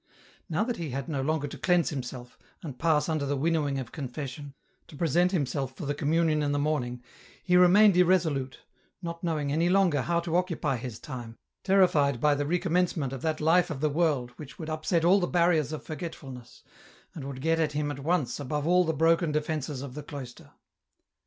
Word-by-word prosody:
Now 165 +5 +1
that 240 +1 -3
he 165 -3 -4
had 135 +1 -4
no 145 -5 -2
longer 145 +1 -1
to - - -9
cleanse 175 -2 +2
himself, 125 -3 -6 0.3
and 140 -6 -7
pass 160 -2 +2
under 155 -3 -1
the 140 0 -1
winnowing 150 -2 0
of 130 -3 -5
confession, 140 0 -6 0.3
to - - -13
present 175 +4 +2
himself 140 -6 -2
for - - -6
the 145 - -1
Communion 155 +1 +1
in 145 -1 0
the - - 0
morning, 130 -5 -1 0.4
he 180 -1 +2
remained 185 +3 +6
irresolute, 165 -7 +2 0.4
not 170 0 -6
knowing 155 -4 -1
any 165 +4 +2
longer 180 -7 +3
how 170 +5 0
to 170 -1 -3
occupy 170 -7 0
his 120 -2 -6
time, 120 -7 -8 0.3
terrified 170 -9 +3
by 150 +3 +3
the 145 0 -1
recommencement 170 -4 0
of 135 - -6
that 155 -1 -1
life 165 +4 +3
of 150 -5 -4
the 155 +1 +1
world 145 -6 0
which 145 -3 -10
would 160 -1 -6
upset 160 +2 0
all 190 +3 +5
the 175 - 0
barriers 170 -5 +2
of 155 - -5
forgetfulness, 140 -6 -8 0.5
and 155 - -7
would 135 -1 -6
get 165 +3 +1
at 155 -2 0
him 145 0 -1
at 140 - -6
once 150 -2 -1
above 145 +1 -3
all 180 +2 +4
the 160 -2 -1
broken 165 +1 +3
defences 150 -2 -2
of 135 -3 -7
the 150 - -6
cloister. 135 -4 -9
155 Hz, 200 wpm, -28 LUFS, 140-170 Hz, 0.5 s, remained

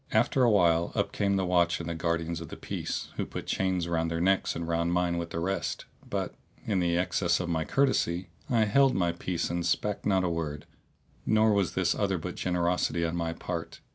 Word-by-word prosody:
After 135 - +2
a 120 - +6
while 85 -5 +3
up - - 0
came 100 -1 +1
the 95 -1 +1
watch 85 -1 +2
and 85 0 -4
guardians 85 0 -1
of 80 - -8
the - - -8
peace, - - -4
who - - -1
put - - -6
chains 95 -2 0
round 85 -1 0
their 85 0 -2
necks 95 +2 +2
and 85 0 -4
round 85 +1 0
mine 90 -1 +1
with 85 0 -4
the 85 - -3
rest; 95 +1 -2 0.2
but, - - -2 0.3
in 100 -4 +1
the 85 -1 +1
excess 90 -1 +1
of 90 -1 -3
my 80 -2 0
courtesy, 95 -10 +1 0.2
I 115 -3 +3
held 135 +5 +4
my 85 -2 +2
peace 85 0 -3
and 85 0 -1
spake 100 +4 0
not 95 -2 +2
a - - +1
word; 80 -3 -3 0.6
nor 110 0 +4
was 100 -3 +1
this - - +2
other - - 0
but - - -5
generosity 90 -1 0
on 85 +1 -2
my 85 -1 -1
part. 85 0 -5
85 Hz, 210 wpm, -29 LUFS, 85-95 Hz, 0.6 s, a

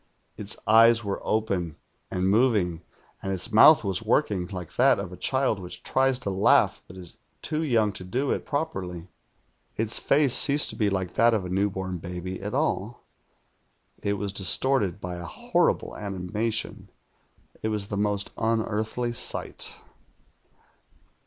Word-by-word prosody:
Its 105 0 -4
eyes 115 +1 +5
were 100 -1 -4
open 95 -7 -2 0.3
and 90 +1 -1
moving, 100 -6 +1 0.4
and 95 - -4
its 95 +5 -2
mouth 120 +8 +7
was 95 -1 -1
working, 105 -5 0
like 90 -5 -8
that - - +4
of 90 - -6
a - - -7
child 130 -1 0
which 90 -2 -9
tries 130 -1 +1
to 110 -6 -4
laugh 95 +1 +3
but 95 - -13
is 90 -2 -11 0.3
too 155 0 -2
young 115 -9 +1
to 95 - -5
do 125 +10 -2
it - - -2
properly. 95 - -4 0.7
Its 110 0 -1
face 140 -3 +2
ceased 145 +1 +6
to - - -10
be 105 -3 +1
like 95 -2 -3
that 115 +1 +3
of 100 -4 -2
a - - -6
new 100 +3 0
born 95 -2 -5
baby 90 +2 -6
at 105 +4 -5
all. 120 -6 -2 1.0
It 100 - -1
was 100 -1 -3
distorted 100 0 +2
by 90 -2 -6
a 85 - -7
horrible - - -1
animation. 105 +1 -4 0.7
It - - -2
was 105 -2 -3
the - - -3
most 100 0 -1
unearthly 110 +1 -1
sight. - - -1
105 Hz, 155 wpm, -25 LUFS, 95-115 Hz, 1.0 s, mouth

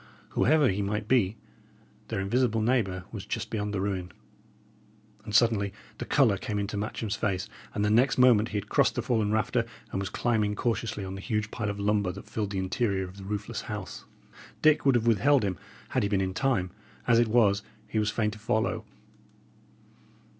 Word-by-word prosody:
Whoever 150 0 +3
he 100 +1 -1
might 105 +1 -2
be, 115 -4 +2 0.7
their - - -3
invisible 115 +3 +1
neighbour 110 -6 +1
was 105 -4 -6
just 115 -2 -4
beyond 105 -2 -2
the 100 - -2
ruin. 95 -2 -2 1.1
And 105 - -5
suddenly 110 -4 +3 0.3
the - - -3
colour 120 -9 +3
came 105 - -3
into 100 +1 -2
Matcham's 105 +1 -3
face, 95 -5 -1 0.3
and 105 0 +1
next 135 +3 +3
moment 120 -4 +5
he 105 - -2
had 100 0 -4
crossed - - +2
the 120 - -1
fallen 110 -4 +1
rafter, 110 +2 +1 0.3
and - - -2
was 95 -2 -3
climbing 105 -2 0
cautiously 115 -3 -2
on 95 - -5
the 95 - -7
huge 105 -1 -2
pile 110 -4 -2
of 100 0 -4
lumber 100 -2 +1
that - - -10
filled 105 -2 -3
the 100 - -4
interior 95 +1 0
of 90 +2 -13
the 100 - -9
roofless 100 +1 -4
house. - - -7 0.6
Dick 155 -2 +4
would 135 - +5
have 115 -1 +2
withheld 120 +4 +4
him, 95 -2 -1 0.3
had - - +1
he 100 - 0
been 100 -2 +1
in 95 -1 -1
time; 105 -6 0 0.3
as 115 -1 +5
it 120 - +3
was, 105 -3 +3 0.3
he 110 - -1
was 105 -1 +1
fain 105 0 0
to 105 - -10
follow. 110 +1 -1
105 Hz, 190 wpm, -28 LUFS, 100-115 Hz, 1.1 s, moment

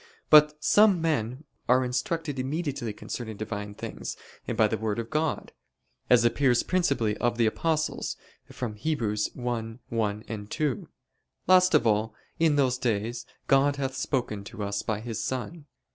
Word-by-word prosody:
But 150 0 +6
some 205 -4 +5
men 140 -5 -1 0.3
are 130 +1 +4
instructed 140 +3 -2
immediately 140 -3 -2
concerning 110 +1 -6
Divine 105 -1 -5
things 115 +1 -6 0.4
by 110 - +4
the 110 - -1
Word 110 -1 -2
of 115 -1 -5
God; 155 0 -1 0.6
as 120 -1 +6
appears 125 0 +3
principally 140 - +1
of 120 -1 0
the 115 - +3
apostles 155 +7 -1 0.3
from 110 -4 -5
Heb. 155 +8 -1
1:1, 110 -1 -3
2: 150 -5 -2 0.6
"Last 185 0 +5
of 120 - +4
all, 110 0 +1 0.2
in 160 -2 +4
these 130 -3 +2
days 120 0 -2 0.2
(God) 140 +1 +4
hath 135 -2 -2
spoken 125 -6 -2
to 105 - -6
us 100 0 -2
by 110 -1 -2
His 115 -2 -4
Son." 135 +6 -4
120 Hz, 145 wpm, -27 LUFS, 110-145 Hz, 0.6 s, But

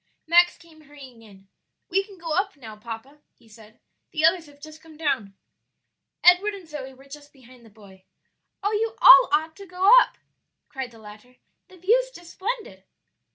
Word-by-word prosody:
Max 345 +2 +4
came 325 -2 -20
hurrying 270 -5 -15
in. 195 -3 -19 0.4
"We 390 +2 +1
can 395 -1 -17
go 330 -2 -7
up 385 +2 -1
now, 225 -5 -11
papa," 230 +6 -10 0.2
he 230 - -26
said; 220 0 -18 0.3
"the 310 0 0
others 335 -1 +2
have 305 +2 -15
come 320 -2 -17
down." 255 -11 -3 0.9
Edward 370 +4 +4
and 375 -4 -13
Zoe 285 -4 -8
were 270 +1 -19
just 290 +1 -13
behind 255 -2 -19
the 225 - -17
boy. 195 -3 -19 0.6
"Oh, 410 - 0
you 440 +1 -2
ought 370 +8 +8
all 310 +2 0
to 395 +5 -14
go 365 +3 +2
up," - - -4 0.5
cried 265 -3 -6
the 230 - -18
latter; 215 +3 -15 0.3
"the 370 - -18
view's 470 +8 +1
just 345 -8 -15
splendid." 460 +4 -6
300 Hz, 175 wpm, -23 LUFS, 240-365 Hz, 0.9 s, ought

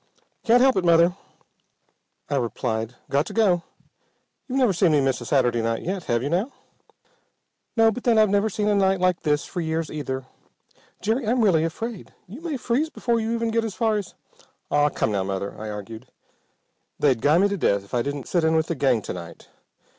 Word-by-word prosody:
"Can't 240 0 +5
help 265 -4 +4
it, 190 - +1
Mother," 170 +1 +4 1.1
I 145 - -2
replied. 115 -1 -2 0.2
"Got 145 +4 +1
to - - -7
go. 195 -6 +3 0.9
You've 265 0 -2
never 250 -7 +3
seen 175 -2 +3
me 150 - +4
miss 135 -3 0
a 120 - -7
Saturday 120 -2 +2
night 115 0 -2
yet, 185 -1 -3
have 120 0 0
you 140 - -2
now?" 195 +10 0 1.3
"No. 225 0 +5
But 245 +3 -7
then 235 -2 +4
I've 215 0 +6
never 205 +2 +2
seen 210 +1 -2
a 210 - +3
night 195 -1 +2
like 185 -1 +1
this 150 -1 0
for 175 - -4
years 160 0 -2
either. 135 -3 -4 0.8
Jerry, 225 +4 0
I'm 240 +2 +2
really 170 -7 +4
afraid. 210 +6 -5
You 225 - -10
may 325 -5 -3
freeze 255 +6 0
before 235 -6 -1
you 225 0 -2
even 230 -1 -1
get 230 0 +1
as 220 -4 -4
far 225 -2 +1
as 200 -3 -6 0.3
" - - -36
"Ah, 145 0 +3
come 110 - -1
now, 100 -2 0
Mother," 95 +1 -3
I 110 0 -7
argued. 110 +4 -8 0.9
"They'd 130 -6 +2
guy 150 +5 +4
me 195 +3 +4
to 200 - -1
death 100 - +1
if 100 - -20
I 120 - +2
didn't 140 +1 -4
sit 175 -2 +1
in 160 0 +3
with 160 -1 +2
the - - +1
gang 130 -6 +1
to - - -5
night. 85 -2 -10
170 Hz, 210 wpm, -24 LUFS, 130-220 Hz, 1.3 s, I've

